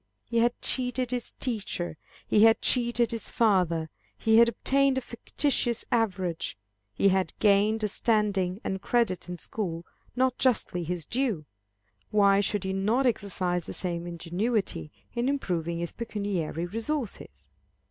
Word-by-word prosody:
He 235 Hz, -, 0 dB
had 240 Hz, +1 st, +2 dB
cheated 250 Hz, -1 st, 0 dB
his 245 Hz, -1 st, -2 dB
teacher; 200 Hz, -9 st, -3 dB, 0.3 s
he 210 Hz, -, +3 dB
had 225 Hz, 0 st, +6 dB
cheated 240 Hz, -2 st, +2 dB
his 230 Hz, -1 st, -2 dB
father; 180 Hz, -8 st, +2 dB, 0.3 s
he 220 Hz, 0 st, +4 dB
had 235 Hz, 0 st, +7 dB
obtained 275 Hz, +3 st, +2 dB
a -, -, 0 dB
fictitious 240 Hz, 0 st, -1 dB
average; 185 Hz, -, -1 dB, 0.3 s
he 195 Hz, -, +3 dB
had 190 Hz, -3 st, 0 dB
gained 210 Hz, +2 st, +3 dB
a -, -, +3 dB
standing 200 Hz, -4 st, +1 dB
and 190 Hz, 0 st, -3 dB
credit 210 Hz, -8 st, 0 dB
in 180 Hz, -, -5 dB
school 170 Hz, -3 st, -4 dB, 0.3 s
not 255 Hz, 0 st, +1 dB
justly 220 Hz, -8 st, +2 dB
his 170 Hz, -1 st, -3 dB
due; 230 Hz, -, -1 dB, 0.6 s
why 200 Hz, -1 st, +4 dB
should 205 Hz, -1 st, -1 dB
he 190 Hz, 0 st, -2 dB
not 215 Hz, +8 st, +1 dB
exercise 185 Hz, -6 st, -1 dB
the -, -, -5 dB
same 175 Hz, -2 st, -2 dB
ingenuity 175 Hz, +1 st, -2 dB, 0.2 s
in 245 Hz, +2 st, 0 dB
improving 170 Hz, -, -2 dB
his 170 Hz, 0 st, -3 dB
pecuniary 200 Hz, -8 st, -3 dB
resources? 220 Hz, -, -4 dB
205 Hz, 140 wpm, -27 LUFS, 180-235 Hz, 0.6 s, had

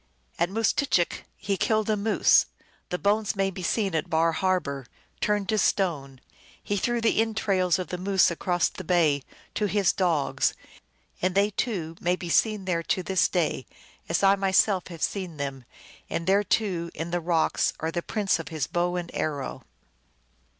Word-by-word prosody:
At 170 Hz, -, +2 dB
Moose 220 Hz, +2 st, +1 dB
tchick 185 Hz, -, 0 dB
he 195 Hz, -1 st, -2 dB
killed 215 Hz, +1 st, +1 dB
a 215 Hz, -, +2 dB
moose; 210 Hz, +1 st, +4 dB, 0.4 s
the 180 Hz, -, -1 dB
bones 205 Hz, +2 st, +1 dB
may 195 Hz, 0 st, 0 dB
be 190 Hz, -, -7 dB
seen 195 Hz, +1 st, 0 dB
at 160 Hz, +2 st, -1 dB
Bar 165 Hz, +1 st, +3 dB
Har 185 Hz, +3 st, +1 dB
bor 140 Hz, -5 st, -6 dB, 0.3 s
turned 205 Hz, -2 st, 0 dB
to 215 Hz, -1 st, +2 dB
stone. 145 Hz, -12 st, 0 dB, 0.4 s
He 205 Hz, -, -1 dB
threw 240 Hz, +4 st, 0 dB
the 225 Hz, -1 st, +3 dB
entrails 195 Hz, -5 st, +1 dB
of 185 Hz, -4 st, -5 dB
the 180 Hz, -, -4 dB
Moose 190 Hz, -1 st, +3 dB
across 175 Hz, 0 st, +1 dB
the 185 Hz, -, -8 dB
bay 160 Hz, -5 st, +2 dB, 0.3 s
to 210 Hz, -, 0 dB
his 200 Hz, -2 st, +2 dB
dogs, 170 Hz, -7 st, +1 dB, 0.7 s
and 185 Hz, 0 st, 0 dB
they, 200 Hz, +2 st, +3 dB
too, 175 Hz, -7 st, -3 dB
may 180 Hz, +1 st, +2 dB
be 175 Hz, -1 st, -7 dB
seen 210 Hz, +2 st, +2 dB
there 175 Hz, -3 st, 0 dB
to 185 Hz, +2 st, -1 dB
this 190 Hz, 0 st, +2 dB
day, 165 Hz, -7 st, -1 dB, 0.4 s
as 165 Hz, +3 st, 0 dB
I 195 Hz, 0 st, +6 dB
myself 195 Hz, -1 st, +2 dB
have 170 Hz, -3 st, -7 dB
seen 185 Hz, -6 st, -3 dB
them; 135 Hz, -3 st, -5 dB, 0.4 s
and 165 Hz, -, -3 dB
there, 195 Hz, +3 st, +3 dB
too, 185 Hz, -6 st, 0 dB
in 165 Hz, +2 st, -4 dB
the 175 Hz, 0 st, -1 dB
rock 165 Hz, -1 st, +1 dB, 0.2 s
are 160 Hz, +1 st, -2 dB
the 175 Hz, -, -2 dB
prints 205 Hz, -2 st, 0 dB
of 165 Hz, -, -6 dB
his 155 Hz, -5 st, -2 dB
bow 175 Hz, +5 st, -1 dB
and 175 Hz, -1 st, -4 dB
arrow." 145 Hz, -4 st, -3 dB
180 Hz, 180 wpm, -26 LUFS, 165-200 Hz, 0.7 s, I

